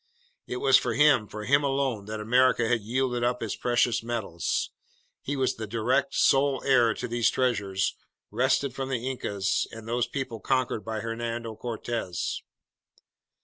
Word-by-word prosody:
It 125 Hz, -, -3 dB
was 135 Hz, 0 st, +5 dB
for 120 Hz, -2 st, -1 dB
him, 140 Hz, -6 st, +4 dB
for 105 Hz, +1 st, -7 dB
him 140 Hz, +4 st, +4 dB
alone, 135 Hz, -6 st, 0 dB
that 110 Hz, +1 st, -5 dB
America 120 Hz, +1 st, +3 dB
had 120 Hz, -1 st, +1 dB
yielded 125 Hz, +2 st, -1 dB
up 125 Hz, 0 st, 0 dB
its 110 Hz, -, -3 dB
precious 120 Hz, -1 st, +1 dB
metals. 115 Hz, -8 st, -2 dB, 0.5 s
He 145 Hz, -, -3 dB
was 130 Hz, -2 st, +1 dB
the 110 Hz, -1 st, -5 dB
direct, 125 Hz, +6 st, 0 dB
sole 135 Hz, -1 st, +3 dB
heir 120 Hz, -4 st, +4 dB
to 125 Hz, -, -4 dB
these 120 Hz, -1 st, +2 dB
treasures 100 Hz, -7 st, 0 dB, 0.4 s
wrested 140 Hz, -3 st, +1 dB
from 135 Hz, 0 st, -4 dB
the 125 Hz, -1 st, -2 dB
Incas 100 Hz, -7 st, -1 dB
and 115 Hz, 0 st, -10 dB
those 120 Hz, +1 st, 0 dB
peoples 120 Hz, -4 st, -5 dB
conquered 130 Hz, -4 st, 0 dB
by 110 Hz, -1 st, -4 dB
Hernando 115 Hz, 0 st, -4 dB
Cortez! 115 Hz, -5 st, -3 dB
120 Hz, 155 wpm, -27 LUFS, 110-130 Hz, 0.5 s, was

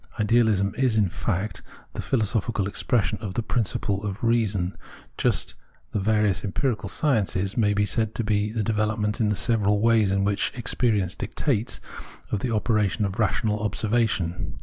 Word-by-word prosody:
Idealism 105 Hz, -3 st, +3 dB
is 125 Hz, -4 st, +2 dB
in 100 Hz, -4 st, +3 dB
fact 100 Hz, +3 st, -2 dB, 0.3 s
the -, -, -4 dB
philosophical 110 Hz, -3 st, 0 dB
expression 105 Hz, +1 st, 0 dB
of 100 Hz, -4 st, -5 dB
the 115 Hz, -, 0 dB
principle 105 Hz, -3 st, -1 dB
of 100 Hz, +1 st, -5 dB
reason, 105 Hz, -6 st, +1 dB, 0.4 s
just -, -, +1 dB
as -, -, -7 dB, 0.4 s
the -, -, -1 dB
various 105 Hz, -1 st, +1 dB
empirical 105 Hz, 0 st, -1 dB
sciences 105 Hz, -, 0 dB
may 105 Hz, -3 st, +2 dB
be 105 Hz, 0 st, +2 dB
said 110 Hz, +1 st, -1 dB
to 120 Hz, -, -1 dB
be 105 Hz, -1 st, 0 dB
the 110 Hz, -1 st, -1 dB
development, 105 Hz, 0 st, 0 dB
in 110 Hz, -, +3 dB
the 105 Hz, -, +1 dB
several 105 Hz, -1 st, +2 dB
ways 110 Hz, -2 st, +3 dB
which 100 Hz, +1 st, +1 dB
experience 110 Hz, -5 st, 0 dB
dictates, 115 Hz, +2 st, -2 dB, 0.5 s
of 105 Hz, -, 0 dB
the 125 Hz, -, -2 dB
operation 105 Hz, -2 st, +1 dB
of 100 Hz, +3 st, -4 dB
rational 110 Hz, -1 st, +1 dB
observation. 105 Hz, -5 st, -1 dB
105 Hz, 155 wpm, -25 LUFS, 100-115 Hz, 0.5 s, Idealism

